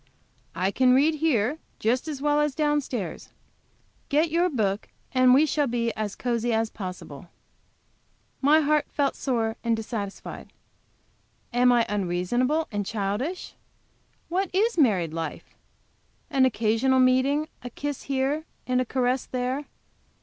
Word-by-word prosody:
I 185 +2 0
can 255 +3 +4
read 305 +4 +3
here 290 -2 +1 0.2
just 250 +7 0
as 290 -3 -5
well 295 0 +3
as 295 -2 0
down 295 -1 +2
stairs. 215 - -5 0.8
Get 310 +2 +2
your 345 +2 +2
book 210 - -1 0.3
and 255 -1 +5
we 275 +5 +6
shall 295 -1 +1
be 235 -1 -1
as 210 -2 -4
cosy 240 -1 -1
as 225 0 0
possible." 180 -5 -8 1.1
My 300 +3 +5
heart 300 0 +1
felt 280 -2 0
sore 225 -4 -1
and 230 -1 +2
dissatisfied. 215 -3 -6 1.0
Am 250 +1 +5
I 240 -2 +4
unreasonable 210 - 0
and 205 -1 -1
childish? 215 - -3 0.7
What 370 +2 -1
is 445 +5 +2
married 195 - +2
life? 165 0 -5 0.8
An 270 -2 +4
occasional 255 +2 +2
meeting, 260 +4 +3
a 245 - -6
kiss 290 +3 -5
here 275 +3 0 0.2
and 255 0 +1
a - - -1
caress 255 +1 0
there? 255 +3 -2
255 Hz, 135 wpm, -26 LUFS, 220-290 Hz, 1.1 s, we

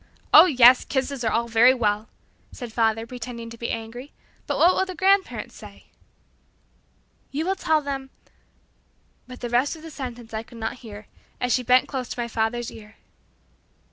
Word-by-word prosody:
"Oh, - - +10
yes; 255 -4 +6
kisses 265 -1 -3
are 225 - +1
all 235 0 0
very 235 +3 +5
well," 215 -2 -1 0.4
said 240 -4 -9
father, 225 -1 +1
pretending 235 -1 -8
to 230 - -10
be 235 - -4
angry, 230 +5 -6 0.4
"but - - -1
what 355 +2 +5
will - - +1
the 370 -1 -6
grandparents 385 +2 +1
say?" - - -13 1.4
"You 300 +4 -3
will 380 +1 0
tell 315 -5 +1
them" 275 -2 -5 1.2
but 255 0 -11
the 240 - -4
rest 255 +6 +1
of 320 - -14
the 325 - -9
sentence 245 -5 -8
I 220 - -2
could 230 +1 -15
not 225 +2 -4
hear, 215 -3 -10 0.3
as 250 -1 0
she 255 - +2
bent 250 +1 +3
close 255 -4 -5
to - - -6
my 235 - -2
father's 230 +1 -2
ear. 215 0 -14
245 Hz, 175 wpm, -24 LUFS, 230-275 Hz, 1.4 s, Oh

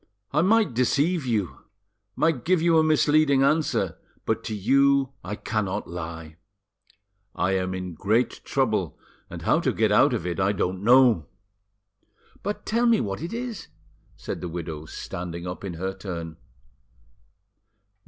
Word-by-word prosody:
"I 150 - +2
might 210 - +3
deceive 140 +6 +1
you, 105 -7 -1 0.6
might 155 -7 +1
give 185 0 +3
you 165 0 +4
a - - +4
misleading 150 -2 +3
answer, 155 +3 +1 0.3
but 110 0 -1
to 110 - -3
you 135 +5 +3
I 105 +3 -4
cannot 105 -3 -3
lie. 80 -2 -7 1.0
I 90 +2 0
am 95 -1 -1
in 90 -1 -5
great 110 +9 0
trouble, - - 0 0.3
and - - -8
how - - +3
to - - +1
get - - +1
out - - +5
of - - -4
it 90 +2 -3
I 95 +2 +2
don't 95 -1 -2
know." 120 - +5 1.1
"But 205 +2 -4
tell 235 +2 +1
me 230 -2 +4
what 100 +3 -3
it 170 - -5
is," 235 -2 -5 0.5
said - - -6
the 90 - -4
widow, 80 -2 -6
standing 85 +1 -6
up 90 +2 -6
in 95 -4 -5
her 95 +3 -3
turn. 85 -4 -7
110 Hz, 150 wpm, -25 LUFS, -, 1.1 s, out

